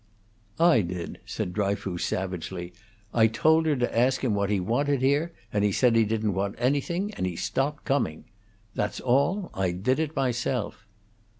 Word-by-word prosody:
"I 165 -9 +5
did," 90 -1 -5
said 90 - -3
Dryfoos, 100 -3 -1
savagely. 90 -1 -3 0.4
"I 110 -1 +5
told 160 +8 +3
her 150 - +3
to 125 -2 -1
ask 125 +3 +2
him 120 -5 +1
what 100 -1 0
he 105 -2 +1
wanted 130 +8 0
here, 145 +5 +2 0.2
and 105 -1 +1
he 105 - +3
said 120 +3 +3
he 115 -1 +5
didn't 110 -1 0
want 100 +2 -2
anything, 145 - 0
and 95 - -2
he 90 - -4
stopped 140 - -2
coming. 135 - 0 0.5
That's 105 - -2
all. 140 +10 +1
I 95 -1 0
did 125 - 0
it 160 -1 -2
myself." 125 -4 -2
115 Hz, 170 wpm, -26 LUFS, 100-140 Hz, 0.5 s, I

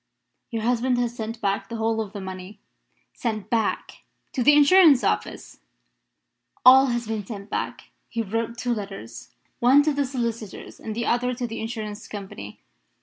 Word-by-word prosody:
"Your 225 -2 -3
husband 245 +1 +1
has 240 -1 -1
sent 225 0 -5
back 195 0 -1
the 230 - -5
whole 225 0 0
of 210 -3 -6
the 205 - -7
money." 190 +2 -8 0.5
"Sent 215 -4 -4
back? 230 -2 -1 0.4
To 255 - -1
the 295 +5 +6
Insurance 295 -2 +7
Office?" - - -2 1.1
"All 265 +2 +9
has 240 -1 -1
been 220 -1 -3
sent 200 0 -9
back. - - -4 0.2
He 230 - -2
wrote 225 +3 -3
two 240 +1 -1
letters 195 - -7 0.3
one 265 +4 +6
to 305 0 +1
the 285 0 0
solicitors 235 -5 -5
and 220 -1 -6
the 235 +1 -2
other 250 +1 +1
to 245 - -3
the 225 -1 -5
Insurance 220 -2 -5
Company. 190 - -8
230 Hz, 165 wpm, -24 LUFS, 210-245 Hz, 1.1 s, All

